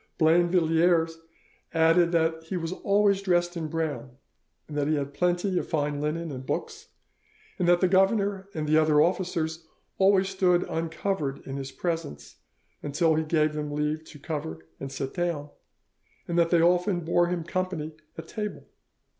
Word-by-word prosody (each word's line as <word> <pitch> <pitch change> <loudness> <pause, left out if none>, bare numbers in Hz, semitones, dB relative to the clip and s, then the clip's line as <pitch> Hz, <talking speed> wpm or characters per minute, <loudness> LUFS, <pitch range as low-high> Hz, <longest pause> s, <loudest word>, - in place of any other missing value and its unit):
Blainvilliers 165 0 +3 0.6
added 165 +1 +4
that 160 -1 +1
he 180 +3 -3
was 165 -1 -3
always 200 +1 +2
dressed 175 -2 +1
in 165 -2 -3
brown, 150 -5 -4 0.5
that 145 -1 -2
he 155 - +2
had 140 -1 -3
plenty 180 +3 +1
of - - -6
fine 145 -2 -1
linen 160 +2 -2
and 130 -1 -6
books, 445 - -4 0.7
that 175 -1 +3
the 185 - +5
governor 195 +1 +2
and 155 -1 -2
the 155 +1 +4
other 155 -1 +4
officers 165 -2 0 0.3
always 195 0 +4
stood 185 -2 +2
uncovered 160 -3 -3
in 135 - -5
his 135 -1 -5
presence 160 - -4 0.6
till 160 +2 +3
he 160 +1 +1
gave 155 -1 +1
them 150 -1 -4
leave 150 +1 -1
to 155 - -12
cover 140 - -5
and 135 - -6
sit 135 -1 -4
down, 170 -5 -2 0.8
and 170 - -2
that 170 -1 +3
they 170 -1 +4
often 180 +1 +2
bore 170 +1 +2
him 175 -1 -2
company 170 -3 -3 0.2
at - - -8
table. 210 -1 -5
165 Hz, 155 wpm, -27 LUFS, 150-180 Hz, 0.8 s, the